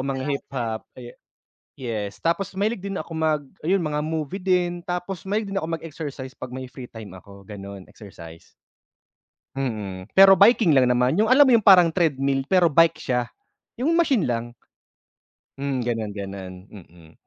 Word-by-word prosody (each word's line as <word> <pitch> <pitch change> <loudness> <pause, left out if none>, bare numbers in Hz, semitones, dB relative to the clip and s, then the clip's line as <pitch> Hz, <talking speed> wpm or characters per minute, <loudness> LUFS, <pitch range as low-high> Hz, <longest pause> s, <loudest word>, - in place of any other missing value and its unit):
mga 135 0 -3
hip-hop, 120 -5 -4
ah, - - -17
ye 120 -1 -10 0.6
yes. 110 -6 -5
Tapos 185 +3 -1
mahilig 205 +2 -1
din 195 0 -5
ako 165 - -6
mag 160 -2 0 0.2
ayun, 180 +2 0
mga 150 -1 -2
movie 155 +3 -4
din. 180 -2 0
Tapos 180 +1 -4
mahilig 205 0 -2
din 195 - -1
ako 165 +1 -3
mag-exercise 145 -5 -8
'pag 130 - -8
may 130 - -6
free 130 -1 -10
time 110 -4 -11
ako, 100 +1 -14
gano'n, 100 -1 -9
exercise. 85 -5 -13 1.1
Mm. 105 -8 -4
Pero 195 0 +9
biking 205 -3 +5
lang 130 -3 +4
naman. 125 +3 +2
Yung 220 - +2
alam 270 +3 +7
mo 260 - +4
yung 230 -3 +4
parang 180 -4 +7
treadmill 135 -5 0
pero 180 -4 +3
bike 165 +1 +4
siya? 125 -4 -2 0.5
Yung 320 +6 +1
machine 275 - +2
lang? 120 0 -3 1.1
Hmm, 135 -3 -2
ganun 115 -3 -2
ganun, 95 -2 -7 0.2
mm. 85 -4 -15
140 Hz, 165 wpm, -23 LUFS, 115-180 Hz, 1.1 s, Pero